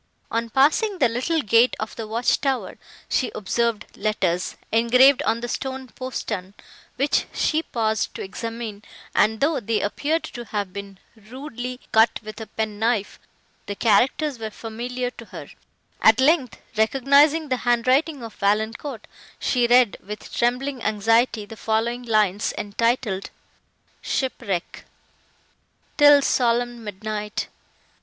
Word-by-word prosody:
On 230 Hz, 0 st, -1 dB
passing 315 Hz, -, +3 dB
the 265 Hz, -, +4 dB
little 255 Hz, +8 st, -1 dB
gate 230 Hz, +3 st, +4 dB
of 215 Hz, -, -5 dB
the 225 Hz, -2 st, -6 dB
watch 230 Hz, +3 st, +1 dB
tower, 270 Hz, -3 st, -2 dB, 0.3 s
she 255 Hz, -, 0 dB
observed 230 Hz, +2 st, -1 dB
letters, 190 Hz, -4 st, -1 dB, 0.2 s
engraved 250 Hz, +4 st, +5 dB
on 230 Hz, +1 st, +1 dB
the 240 Hz, -, -3 dB
stone 265 Hz, +1 st, -4 dB
postern, 210 Hz, -6 st, -5 dB, 0.4 s
which 275 Hz, +3 st, +1 dB
she 315 Hz, 0 st, +1 dB
paused 220 Hz, -7 st, -1 dB
to -, -, -5 dB
examine, 225 Hz, +1 st, -6 dB, 0.3 s
and, 220 Hz, +1 st, +2 dB
though 290 Hz, 0 st, +2 dB
they 225 Hz, -1 st, -1 dB
appeared 300 Hz, +10 st, -1 dB
to 240 Hz, -2 st, -7 dB
have 205 Hz, -4 st, -4 dB
been 200 Hz, -1 st, -8 dB, 0.2 s
rudely 250 Hz, +2 st, -7 dB
cut 220 Hz, +1 st, +4 dB
with 215 Hz, +1 st, -8 dB
a 220 Hz, -, -7 dB
pen 215 Hz, -2 st, -4 dB
knife, 220 Hz, -2 st, 0 dB, 0.5 s
the 205 Hz, -, -4 dB
characters 245 Hz, +6 st, +2 dB
were 220 Hz, -1 st, -4 dB
familiar 245 Hz, +3 st, -5 dB
to -, -, -12 dB
her; -, -, -10 dB, 0.5 s
at 220 Hz, +2 st, +6 dB
length, 270 Hz, -2 st, +3 dB, 0.2 s
recognising 280 Hz, +7 st, +3 dB
the 255 Hz, -, +1 dB
hand 240 Hz, -1 st, +1 dB
writing 275 Hz, +1 st, +2 dB
of 225 Hz, -2 st, -8 dB
Valancourt, 220 Hz, +4 st, -1 dB, 0.3 s
she 245 Hz, -2 st, +1 dB
read, 245 Hz, -2 st, +4 dB
with 210 Hz, +2 st, -8 dB
trembling 250 Hz, +2 st, 0 dB
anxiety 225 Hz, +1 st, +2 dB
the 225 Hz, -, -10 dB
following 225 Hz, +3 st, -1 dB
lines, 215 Hz, -4 st, +1 dB
entitled 210 Hz, -1 st, -1 dB, 0.7 s
SHIPWRECK 215 Hz, -9 st, -3 dB, 1.2 s
'Til 290 Hz, -1 st, +8 dB
solemn 240 Hz, -1 st, +1 dB
midnight! 210 Hz, 0 st, -4 dB
230 Hz, 135 wpm, -23 LUFS, 215-255 Hz, 1.2 s, Til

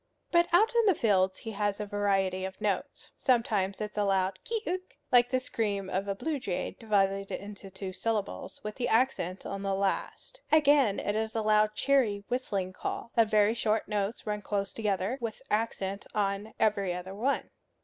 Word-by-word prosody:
But 345 Hz, 0 st, +4 dB
out 425 Hz, +7 st, +5 dB
in 465 Hz, -2 st, +3 dB
the 385 Hz, -, +5 dB
fields 190 Hz, -6 st, +2 dB
he 225 Hz, -, -6 dB
has 205 Hz, 0 st, -1 dB
a 210 Hz, -, -2 dB
variety 195 Hz, -2 st, 0 dB
of 190 Hz, 0 st, -5 dB
notes. 210 Hz, -2 st, -2 dB
Sometimes 215 Hz, -7 st, +1 dB
it 210 Hz, 0 st, -3 dB
is -, -, -16 dB
a -, -, +3 dB
loud 190 Hz, -1 st, +1 dB
kee 455 Hz, -1 st, -2 dB
uk, 370 Hz, +1 st, -4 dB
like 245 Hz, -1 st, +6 dB
the 255 Hz, 0 st, +2 dB
scream 205 Hz, -6 st, -2 dB
of 195 Hz, +2 st, -1 dB
a 200 Hz, -, -1 dB
blue 305 Hz, +6 st, -2 dB
jay 190 Hz, -8 st, -3 dB
divided 195 Hz, -3 st, +1 dB
into 200 Hz, 0 st, -7 dB
two 190 Hz, 0 st, -6 dB
syllables, 210 Hz, +1 st, -3 dB
with 210 Hz, -, -4 dB
the 245 Hz, -2 st, 0 dB
accent 225 Hz, -7 st, +1 dB
on 195 Hz, 0 st, -4 dB
the 195 Hz, -1 st, 0 dB
last. 200 Hz, -, -2 dB
Again 285 Hz, -8 st, +5 dB
it 205 Hz, -, -1 dB
is 220 Hz, 0 st, -2 dB
a 220 Hz, -, 0 dB
loud 215 Hz, 0 st, +3 dB
cheery 245 Hz, -8 st, +2 dB
whistling 200 Hz, -7 st, -1 dB
call, 230 Hz, -, -5 dB
of 230 Hz, -2 st, +4 dB
very 215 Hz, 0 st, +4 dB
short 220 Hz, -2 st, 0 dB
notes 210 Hz, +1 st, -2 dB
run 210 Hz, -1 st, -2 dB
close 200 Hz, -1 st, -2 dB
together, 210 Hz, +3 st, -1 dB
with 230 Hz, -2 st, -4 dB
accent 200 Hz, -2 st, -1 dB
on 200 Hz, +1 st, -1 dB
every 200 Hz, -4 st, +2 dB
other 180 Hz, +2 st, -6 dB
one. 245 Hz, +8 st, -1 dB
210 Hz, 190 wpm, -30 LUFS, 195-235 Hz, -, like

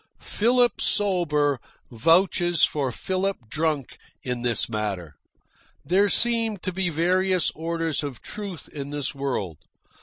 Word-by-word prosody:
Philip 240 Hz, +1 st, +2 dB
sober 150 Hz, -9 st, +1 dB, 0.3 s
vouches 175 Hz, -, +3 dB
for 140 Hz, -4 st, +2 dB
Philip 190 Hz, +8 st, -1 dB
drunk 150 Hz, -1 st, -1 dB, 0.2 s
in 125 Hz, -1 st, -3 dB
this 120 Hz, -3 st, +1 dB
matter. 100 Hz, -8 st, -3 dB, 0.7 s
There 195 Hz, +4 st, +3 dB
seem 230 Hz, -2 st, +2 dB
to 185 Hz, -, -4 dB
be 190 Hz, -1 st, 0 dB
various 180 Hz, +2 st, +2 dB
orders 165 Hz, -1 st, -2 dB
of 140 Hz, -5 st, -5 dB
truth 200 Hz, -5 st, -7 dB
in 140 Hz, -1 st, -7 dB
this 145 Hz, -1 st, -3 dB
world. 125 Hz, -, -3 dB
165 Hz, 120 wpm, -25 LUFS, 135-190 Hz, 0.7 s, vouches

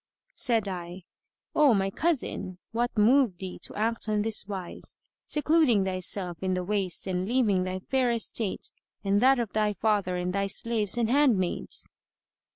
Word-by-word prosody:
Said 225 Hz, -5 st, +2 dB
I, 180 Hz, -1 st, -6 dB, 0.5 s
"O 290 Hz, -6 st, +5 dB
my 195 Hz, 0 st, 0 dB
cousin, 240 Hz, -, -1 dB
what 235 Hz, +1 st, -1 dB
moved 230 Hz, -2 st, +4 dB
thee 185 Hz, 0 st, -7 dB
to -, -, -5 dB
act 225 Hz, +1 st, -1 dB
on 210 Hz, -1 st, +1 dB
this 220 Hz, -2 st, 0 dB
wise, 190 Hz, -4 st, -5 dB, 0.3 s
secluding 300 Hz, -9 st, +3 dB
thyself 185 Hz, -1 st, -2 dB
in 185 Hz, -1 st, 0 dB
the 180 Hz, -, -2 dB
waste 195 Hz, -2 st, -2 dB
and 185 Hz, 0 st, -2 dB
leaving 215 Hz, -6 st, +2 dB
thy 185 Hz, 0 st, -3 dB
fair 260 Hz, +3 st, +1 dB
estate 230 Hz, -3 st, -1 dB, 0.3 s
and 200 Hz, 0 st, +2 dB
that 265 Hz, +3 st, +5 dB
of 235 Hz, -4 st, -3 dB
thy 215 Hz, -1 st, +1 dB
father 205 Hz, -4 st, 0 dB
and 180 Hz, 0 st, -2 dB
thy 200 Hz, 0 st, 0 dB
slaves 225 Hz, 0 st, -1 dB
and 235 Hz, -2 st, +2 dB
handmaids?" 240 Hz, -9 st, +1 dB
210 Hz, 160 wpm, -27 LUFS, 185-235 Hz, 0.5 s, O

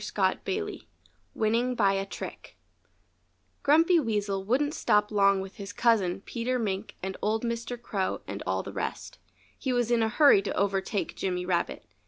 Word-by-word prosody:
(Page -, -, +1 dB
58)] 415 Hz, +1 st, -2 dB
XII -, -, -17 dB, 0.5 s
WINNING 235 Hz, +3 st, +1 dB
BY 200 Hz, -4 st, +3 dB
A 195 Hz, 0 st, -1 dB
TRICK -, -, -8 dB, 1.0 s
Grumpy 325 Hz, +4 st, +5 dB
Weasel 205 Hz, -6 st, -1 dB
wouldn't 275 Hz, +8 st, +1 dB
stop 210 Hz, -6 st, +2 dB
long 200 Hz, -2 st, +4 dB
with 190 Hz, 0 st, -9 dB
his 200 Hz, -1 st, -6 dB
cousin, 205 Hz, -5 st, +2 dB
Peter 245 Hz, +4 st, -2 dB
Mink, 205 Hz, -3 st, -3 dB
and 190 Hz, 0 st, -3 dB
old 220 Hz, +2 st, 0 dB
Mr. 235 Hz, +1 st, -3 dB
Crow 200 Hz, -5 st, -2 dB
and -, -, -6 dB
all -, -, 0 dB
the -, -, -8 dB
rest. -, -, -5 dB, 0.4 s
He 265 Hz, -, -1 dB
was 245 Hz, -1 st, +1 dB
in 235 Hz, -1 st, +3 dB
a 220 Hz, -, +2 dB
hurry 280 Hz, -4 st, +6 dB
to 200 Hz, -, -4 dB
overtake 200 Hz, 0 st, -1 dB
Jimmy 180 Hz, -1 st, -2 dB
Rabbit. 175 Hz, -2 st, -1 dB
215 Hz, 170 wpm, -28 LUFS, 195-245 Hz, 1.0 s, hurry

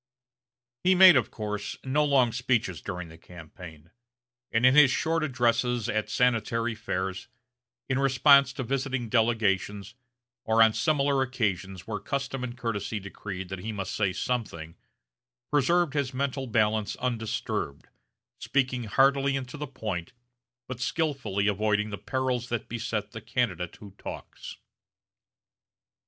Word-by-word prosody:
He 185 Hz, +1 st, +5 dB
made, 185 Hz, -2 st, +9 dB
of 125 Hz, -5 st, +2 dB
course, 105 Hz, -1 st, -5 dB
no 140 Hz, +3 st, +1 dB
long 135 Hz, -5 st, +3 dB
speeches 115 Hz, -7 st, -1 dB
during 90 Hz, -3 st, -6 dB
the 80 Hz, +1 st, -14 dB
campaign, 85 Hz, -1 st, -12 dB, 0.6 s
and 115 Hz, +2 st, +2 dB
in 130 Hz, -, +7 dB
his 150 Hz, -2 st, +7 dB
short 165 Hz, +4 st, 0 dB
addresses, 120 Hz, -3 st, +1 dB
at 110 Hz, 0 st, -1 dB
Sanitary 115 Hz, -1 st, +1 dB
Fairs, 95 Hz, -3 st, -4 dB, 0.6 s
in 130 Hz, 0 st, 0 dB
response 140 Hz, 0 st, +5 dB
to 130 Hz, -, -4 dB
visiting 135 Hz, -1 st, -2 dB
delegations, 105 Hz, -3 st, +1 dB, 0.5 s
or 115 Hz, 0 st, +5 dB
on 110 Hz, -1 st, +4 dB
similar 140 Hz, -2 st, +2 dB
occasions 100 Hz, -8 st, -2 dB
where 105 Hz, -2 st, -4 dB
custom 135 Hz, +2 st, -3 dB
and 120 Hz, -1 st, -5 dB
courtesy 110 Hz, -3 st, -3 dB
decreed 95 Hz, -1 st, -7 dB
that 95 Hz, -1 st, -5 dB
he 110 Hz, +4 st, -4 dB
must 100 Hz, -2 st, -4 dB
say 100 Hz, -3 st, +1 dB
something, 90 Hz, -8 st, -3 dB, 0.8 s
preserved 150 Hz, +2 st, +2 dB
his 140 Hz, -3 st, -1 dB
mental 135 Hz, 0 st, -2 dB
balance 110 Hz, -2 st, +1 dB
undisturbed, 115 Hz, -, -3 dB, 0.5 s
speaking 130 Hz, -3 st, 0 dB
heartily 135 Hz, +4 st, +3 dB
and 130 Hz, -2 st, -5 dB
to -, -, -8 dB
the 150 Hz, 0 st, -5 dB
point, 105 Hz, -10 st, -5 dB, 0.5 s
but 130 Hz, -2 st, -6 dB
skilfully 125 Hz, -, -1 dB
avoiding 105 Hz, +1 st, +1 dB
the 100 Hz, -, -5 dB
perils 125 Hz, +2 st, -2 dB
that 120 Hz, -2 st, -3 dB
beset 110 Hz, -3 st, -3 dB
the 110 Hz, -, -8 dB
candidate 95 Hz, -8 st, -2 dB
who 100 Hz, -2 st, -12 dB
talks. -, -, -8 dB
115 Hz, 135 wpm, -27 LUFS, 105-130 Hz, 0.8 s, made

